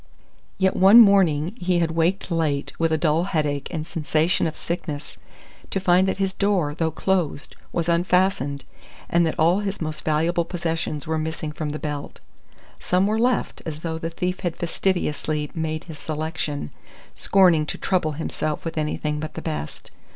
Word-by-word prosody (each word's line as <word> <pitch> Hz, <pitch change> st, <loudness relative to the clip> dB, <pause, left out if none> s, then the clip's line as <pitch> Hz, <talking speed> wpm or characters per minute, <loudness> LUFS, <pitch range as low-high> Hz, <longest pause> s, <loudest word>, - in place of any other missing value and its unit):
Yet 190 Hz, -1 st, +2 dB
one 195 Hz, +5 st, +8 dB
morning 190 Hz, -5 st, +5 dB
he 180 Hz, 0 st, +1 dB
had 165 Hz, -1 st, +1 dB
waked 170 Hz, +3 st, 0 dB
late, 155 Hz, -4 st, 0 dB
with 165 Hz, -1 st, +2 dB
a 160 Hz, -, +3 dB
dull 155 Hz, +2 st, +2 dB
headache 150 Hz, -6 st, -1 dB
and 155 Hz, -3 st, -4 dB
sensation 160 Hz, +2 st, +1 dB
of 160 Hz, -, -5 dB
sickness, 160 Hz, -3 st, -5 dB, 0.5 s
to 195 Hz, -, -1 dB
find 185 Hz, 0 st, +4 dB
that 190 Hz, -, -1 dB
his 195 Hz, -1 st, 0 dB
door, 190 Hz, -7 st, +1 dB
though 160 Hz, +1 st, 0 dB
closed, 160 Hz, -2 st, -1 dB, 0.2 s
was 170 Hz, -1 st, -1 dB
unfastened, 170 Hz, -5 st, +1 dB, 0.5 s
and 170 Hz, -1 st, +4 dB
that 160 Hz, -, -3 dB
all 170 Hz, +5 st, +4 dB
his 200 Hz, -1 st, -3 dB
most 155 Hz, -1 st, -4 dB
valuable 165 Hz, +3 st, +1 dB
possessions 165 Hz, -3 st, -3 dB
were 160 Hz, -1 st, -1 dB
missing 155 Hz, -1 st, -3 dB
from 150 Hz, 0 st, -4 dB
the 150 Hz, -, -3 dB
belt. 150 Hz, -2 st, -5 dB, 0.6 s
Some 180 Hz, +2 st, +2 dB
were 215 Hz, +2 st, +1 dB
left, 245 Hz, +1 st, 0 dB
as 155 Hz, -1 st, -6 dB
though 160 Hz, -1 st, -3 dB
the 165 Hz, -, -3 dB
thief 180 Hz, +2 st, -3 dB
had 175 Hz, -2 st, -3 dB
fastidiously 155 Hz, -4 st, -1 dB
made 160 Hz, 0 st, -3 dB
his 160 Hz, -4 st, -10 dB
selection, 155 Hz, -, -3 dB, 0.4 s
scorning 175 Hz, -6 st, +4 dB
to -, -, -4 dB
trouble 175 Hz, -5 st, 0 dB
himself 155 Hz, 0 st, -3 dB
with 165 Hz, -1 st, -2 dB
anything 150 Hz, 0 st, -2 dB
but 155 Hz, +1 st, -6 dB
the -, -, -4 dB
best. 75 Hz, -1 st, -5 dB
165 Hz, 170 wpm, -23 LUFS, 155-180 Hz, 0.6 s, one